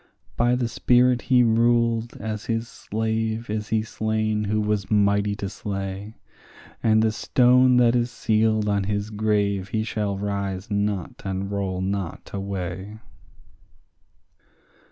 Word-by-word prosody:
By 120 +1 +2
the 125 -1 0
spirit 125 +1 +3
he 125 -2 +6
ruled 115 0 +2
as 110 0 -5
his 115 0 -2
slave 110 0 -3
is 105 -1 -3
he 110 -1 0
slain 110 -1 -1
who 105 +1 0
was 105 -2 -1
mighty 100 -1 +2
to 100 -1 -4
slay, 100 +1 -5 0.7
And 110 -1 +3
the 110 - +2
stone 125 +2 +4
that 120 -1 +4
is 120 0 +1
sealed 110 -2 +1
on 100 -1 +1
his 105 +1 -2
grave 100 -2 0
he 110 -1 -1
shall 105 -3 -2
rise 100 0 -3
not 100 -3 -2
and 95 0 -3
roll 95 -2 -2
not 95 -2 -4
away. 95 +1 -5
105 Hz, 135 wpm, -24 LUFS, 100-115 Hz, 0.7 s, he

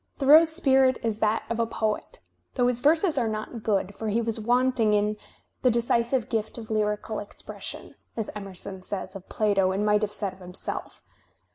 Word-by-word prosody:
Thoreau's 310 +4 +7
spirit 265 -5 +4
is 220 -2 -1
that 215 +1 +1
of 230 0 -3
a 230 - +1
poet, 220 - -3 0.4
though 245 - +2
his 245 -1 +1
verses 315 +3 +3
are 235 - 0
not 215 +2 -4
good, 200 -2 0
for 220 - -5
he 215 +2 +1
was 230 -1 -1
wanting 240 -1 +2
in 210 +1 +1 0.5
"the 255 - +4
decisive 235 +1 +1
gift 225 -2 -2
of 225 -1 -8
lyrical 210 0 -1
expression," 205 - -8 0.2
as 225 - -2
Emerson 195 -2 -6
says 190 0 -5
of 195 -1 -10
Plato 200 -3 +2
and 200 +2 -1
might 210 0 +3
have 210 -1 -1
said 200 -2 -2
of 190 - -18
himself. 180 0 -6
220 Hz, 180 wpm, -26 LUFS, 210-245 Hz, 0.5 s, Thoreau's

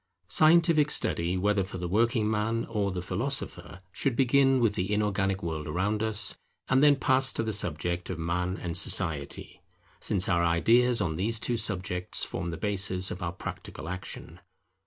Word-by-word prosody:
Scientific 155 - +4
study, 85 - -1
whether 100 +1 +1
for 95 0 -7
the 90 -1 -4
working 110 +3 +1
man 110 +2 -1
or 105 -3 -1
the 90 -1 -4
philosopher, 95 -3 -3
should 125 +5 -1
begin 135 +1 +3
with 115 -4 +2
the 95 +1 -3
inorganic 100 -2 0
world 80 -2 -4
around 95 +7 -1
us, 110 -1 0 0.3
and 130 +1 +3
then 145 -1 +6
pass 135 -1 +3
to - - -2
the 110 -1 -2
subject 85 -2 -3
of 90 - -4
Man 90 +3 -2
and 85 -2 -5
Society; 80 -6 0 0.4
since 95 -2 0
our 85 -2 +2
ideas 115 +8 +3
on 80 -5 -1
these 110 +5 0
two 120 - -1
subjects 95 -4 -2
form 85 0 -4
the 80 - -5
basis 95 -1 +1
of 95 - -6
our 85 - -2
practical 80 -3 -8
action. 90 -1 -7
100 Hz, 170 wpm, -28 LUFS, 90-115 Hz, 0.4 s, then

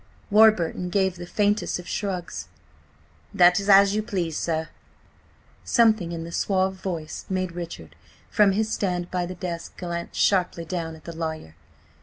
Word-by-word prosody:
Warburton 200 -5 +4
gave 190 -1 +1
the 175 0 -8
faintest 210 +2 +1
of 180 - -10
shrugs. 185 -4 -4 0.9
"That 180 +1 +6
is 200 +1 -4
as 200 0 +7
you 215 - +1
please, 180 -7 -3
sir." 160 0 -2 0.9
Something 220 -7 +3
in 165 -1 -4
the 165 - -8
suave 190 +1 +1
voice 170 -5 -5
made 185 -1 -1
Richard, 165 - -8 0.4
from 205 -2 +4
his 215 +2 0
stand 180 -3 -2
by 180 -1 -1
the 185 - -6
desk, 170 -1 -6
glance 170 -1 -5
sharply 180 -3 +2
down 165 -2 -4
at 155 - -16
the 170 - -8
lawyer. 160 - -5
180 Hz, 155 wpm, -25 LUFS, 170-195 Hz, 0.9 s, as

